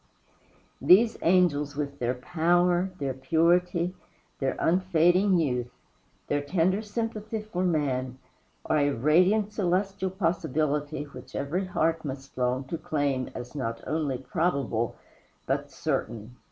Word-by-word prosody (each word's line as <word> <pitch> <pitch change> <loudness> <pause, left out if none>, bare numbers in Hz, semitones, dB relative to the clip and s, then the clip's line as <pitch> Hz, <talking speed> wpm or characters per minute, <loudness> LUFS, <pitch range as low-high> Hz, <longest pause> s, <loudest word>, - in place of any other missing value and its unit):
These 190 - +6
angels, 160 -5 +2
with 140 -1 -4
their 125 +1 0
power, 175 +6 +2
their 140 -5 -2
purity, 170 +5 +2 0.5
their 135 -1 0
unfading 180 +2 +3
youth, 125 -7 0 0.6
their 145 - 0
tender 180 +6 +1
sympathy 220 0 -4
for 185 -4 -3
man, 130 -7 0 0.5
are 155 - +2
a 145 0 +3
radiant 180 - +3
celestial 190 0 0
possibility 155 -5 -1
which 135 -4 -12
every 170 +7 -1
heart 165 -2 0
must 135 -1 -7
long 125 +1 0
to 155 +5 -5
claim 145 -5 -1
as 120 0 -7
not 115 -5 -4
only 150 -4 -1
probable 135 -5 -1 0.5
but - - -1
certain. 115 +1 -3
160 Hz, 120 wpm, -27 LUFS, 135-180 Hz, 0.6 s, These